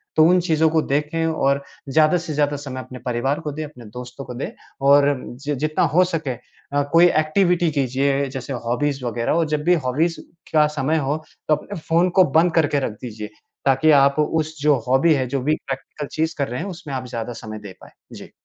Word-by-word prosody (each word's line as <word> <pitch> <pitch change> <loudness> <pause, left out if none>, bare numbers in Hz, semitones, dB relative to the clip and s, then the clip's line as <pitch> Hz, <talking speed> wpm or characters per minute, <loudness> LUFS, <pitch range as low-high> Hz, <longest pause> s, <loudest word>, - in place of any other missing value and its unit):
तो 155 - +6
उन 180 +1 +5
चीज़ों 160 -2 +2
को 160 0 +2
देखें 150 +3 -1
और 140 -3 +1 0.3
ज़्यादा 155 +4 +4
से 165 -2 -5
ज़्यादा 145 0 +1
समय 135 -2 -6
अपने 130 0 -10
परिवार 130 +4 0
को 150 -2 -4
दें, 155 +2 -5
अपने 125 -5 -13
दोस्तों 125 +5 -9
को 125 - -7
दें 125 - -4 0.4
और 145 0 +5
जित 140 +4 -4
जितना 155 +1 0
हो 180 - +7
सके 165 -6 -2 0.5
अ, 145 - +3
कोई 170 +1 +7
एक्टिविटी 175 +2 +2
कीजिए 140 0 0
जैसे 135 +1 -6
हॉबीज़ 135 +3 -1
वग़ैरह। 120 -1 -3
और 165 0 +2
जब 150 -1 -1
भी 175 +3 +4
हॉबीज़ 160 +7 0 0.3
का 155 -1 +5
समय 150 +3 +1
हो 145 +2 0 0.3
तो 155 - +4
अपने 175 +5 -8
फ़ोन 170 +3 +3
को - - +9
बंद 170 +1 +4
करके 150 -3 +3
रख 130 - -2
दीजिए 110 -3 -7 0.4
ताकि 135 +3 +4
आप 140 +2 +3
उस 155 +1 0
जो 150 0 +4
हॉबी 135 +6 +4
है, 135 -3 0
जो 135 +2 -2
भी 150 +4 +1
प्रैक्टिकल 135 +2 -5
चीज़ 160 +1 -1
कर 140 -2 0
रहे 125 +2 -4
हैं 190 - -4
उसमें 170 -6 -8
आप 130 -1 -3
ज़्यादा 115 0 -5
समय 110 0 -7
दे 100 -3 -10
पाएँ। - - -14 0.3
जी। - - -12
145 Hz, 210 wpm, -21 LUFS, 130-160 Hz, 0.5 s, को